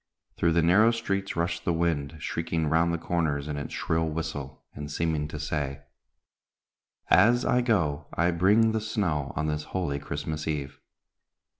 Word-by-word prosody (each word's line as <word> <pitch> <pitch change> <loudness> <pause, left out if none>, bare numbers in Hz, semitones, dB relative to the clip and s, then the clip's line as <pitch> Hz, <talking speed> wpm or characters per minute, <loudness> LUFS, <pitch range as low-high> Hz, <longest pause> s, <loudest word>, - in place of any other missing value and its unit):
Through 85 -1 +2
the 85 -1 +3
narrow 100 +7 +6
streets 100 -4 -2
rushed 85 0 -1
the 85 - +1
wind, 80 -3 0
shrieking 80 0 -2
round 80 +3 +2
the 85 - 0
comers 80 -4 -1
in 75 - -3
its 70 - -5
shrill 80 0 0
whistle, 75 -4 -5
and 75 0 -7
seeming 80 -1 -1
to 75 - -7
say: 70 -2 -3 1.3
"As 120 +2 +5
I 125 - +3
go, 80 - 0
I 85 +1 +1
bring 105 +6 +4
the 110 0 -1
snow, 90 -10 -1
On 80 - -1
this 75 0 -1
holy 70 -6 -1
Christmas 75 +2 -4
Eve. 70 -3 -3
80 Hz, 160 wpm, -27 LUFS, 75-90 Hz, 1.3 s, narrow